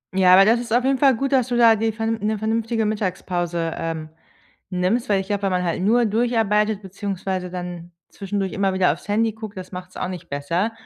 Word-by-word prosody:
Ja, 185 -1 +5
aber 195 +1 +8
das 230 +2 +4
ist 235 -2 -7
auf 245 +2 +3
jeden 270 0 +1
Fall 270 -3 +5
gut, 275 +4 -2
dass 255 -3 +3
du 240 -1 -1
da 230 -2 +6
dir 225 +1 0
vernünf 225 +1 -2
dir - - -4
'ne 215 0 0
vernünftige 225 +1 -1
Mittagspause, 175 -5 -2
ähm, 160 -1 -4 0.6
nimmst, 185 +6 0
weil 195 -1 +3
ich 190 - -10
glaube, 205 -1 -1
wenn 195 - +1
man 180 0 0
halt 175 0 -1
nur 235 +5 +3
durcharbeitet 215 -2 +1
beziehungsweise 190 -1 -4
dann 175 -1 -7 0.2
zwischendurch 195 -1 -3
immer 195 -1 0
wieder 185 -5 +3
aufs 170 - -13
Handy 220 +2 +1
guckt, 220 -2 -9
das 185 - -8
macht's 180 0 -8
auch 180 - -3
nicht 180 -2 -8
besser. 170 +10 -1
200 Hz, 220 wpm, -22 LUFS, 180-225 Hz, 0.6 s, aber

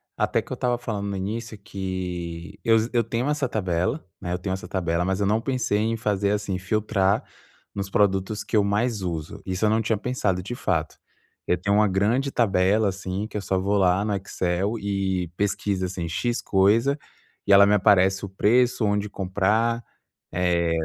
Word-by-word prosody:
até - - +1
que - - -18
eu - - -1
estava 125 -1 0
falando 105 -4 -4
no 100 - -3
início 110 +3 -4
que 95 -2 -5
eu 115 -2 +5 0.2
eu 120 -1 +3
tenho 120 +5 -2
essa 145 -4 0
tabela, 95 - -1 0.2
né, 90 - -4
eu - - 0
tenho 95 0 -3
essa 95 - -5
tabela 85 -2 0
mas 95 +1 -1
eu 100 - +1
não 110 +2 +2
pensei 125 -5 0
em 115 +1 0
fazer 105 -2 0
assim 105 -3 -1
filtrar 100 0 +1 0.5
nos 100 -1 -4
produtos 100 +1 +1
que - - -4
eu 105 - +5
mais 105 +1 0
uso. 85 +2 -4
Isso 95 +3 -1
eu - - +4
não 110 +1 +2
tinha 110 0 0
pensado 100 -5 -1
de 120 +7 -6
fato. 80 -8 -1 0.5
Eu 90 - +1
tenho 100 0 +2
uma 105 0 +4
grande 115 +9 +1
tabela, 100 -1 +2
assim, 95 +2 -3
que - - -15
eu 105 - -1
só 95 -1 0
vou 100 +2 +1
lá 95 0 +3
no 105 -2 0
Excel 95 +3 -2
e 95 -3 -1
pesquisa 100 -2 -1
assim 90 -2 -4
"x" 120 +8 -1
coisa 110 +9 +3 0.5
e 100 - +1
ela 100 0 +9
me 105 - +3
aparece 95 -1 +4
o 100 - -8
preço, 120 +4 +2
onde 105 0 0
comprar, 105 +5 0 0.5
eh, 85 -1 +1
100 Hz, 190 wpm, -24 LUFS, 95-110 Hz, 0.5 s, ela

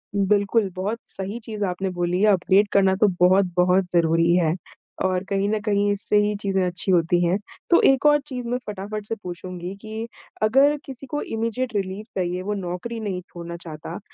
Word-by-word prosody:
बिल्कुल, 200 +1 +2
बहुत 205 +5 -2
सही 195 +4 -5
चीज़ 215 -2 -4
आपने 190 +1 -2
बोली 175 0 -1
है 215 - +5
अपडेट 195 +2 +3
करना 190 -1 +4
तो 210 +2 +4
बहुत-बहुत 180 0 +4
ज़रूरी 165 0 +3
है, 165 -2 +2 0.5
और 185 0 0
कहीं 195 0 +1
न 215 0 0
कहीं 205 -1 +1
इससे 205 +1 +1
ही 210 0 0
चीज़ें 195 -1 0
अच्छी 180 +2 -1
होती 175 0 +3
हैं। 175 +3 +2 0.3
तो 345 - +6
एक 270 +2 +4
और 295 0 +6
चीज़ 250 -3 -5
मैं 245 - 0
फटाफट 210 +1 -5
से 225 - -2
पूछूँगी 180 +1 -6
कि 220 +1 -6 0.4
अगर 270 +7 +4
किसी 270 -1 -9
को 295 +3 -3
इमीडिएट 230 +2 -2
रिलीफ़ 195 +2 -3
चाहिए 180 0 -1
वो 205 +3 -2
नौकरी 195 +4 -4
नहीं 195 -4 -3
छोड़ना 170 0 -7
चाहता 165 0 -8
195 Hz, 185 wpm, -23 LUFS, 180-215 Hz, 0.5 s, तो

